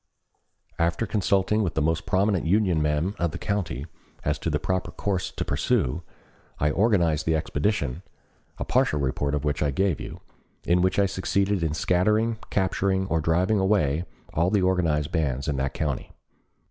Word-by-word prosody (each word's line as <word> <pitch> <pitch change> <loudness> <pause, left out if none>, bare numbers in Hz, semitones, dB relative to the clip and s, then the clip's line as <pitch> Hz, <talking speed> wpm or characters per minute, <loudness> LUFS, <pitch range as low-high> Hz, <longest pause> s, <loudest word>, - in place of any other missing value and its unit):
After 85 +6 +1
consulting 100 0 +1
with 95 -6 -1
the 80 - +1
most 80 +1 0
prominent 95 -3 +1
Union 95 -4 +2
men 75 +5 0
of 85 - +1
the - - -6
county 85 - -2 0.4
as 75 +1 0
to 85 - -2
the 75 - +1
proper 95 +4 -2
course 95 -3 -2
to - - -4
pursue, 75 +7 0 0.6
I 75 +1 +1
organized 85 -6 +2
the 80 - +3
expedition, 80 - -1 0.6
a - - -3
partial 75 - +2
report 70 +1 -1
of 75 0 -3
which 75 -1 -1
I 75 - +2
gave 90 +4 0
you, - - -7 0.5
in 90 +1 +3
which 95 0 +1
I 100 - +4
succeeded 100 0 0
in 80 -2 0
scattering, 110 +7 +1
capturing, 95 0 +1
or 85 -1 +1
driving 90 +7 +2
away 90 -5 +2 0.3
all 85 +3 +2
the 100 -1 +2
organized 85 -6 +1
bands 70 -5 -1
in 70 -2 -1
that 65 0 -2
county. 75 -5 -3
85 Hz, 170 wpm, -25 LUFS, 75-95 Hz, 0.6 s, I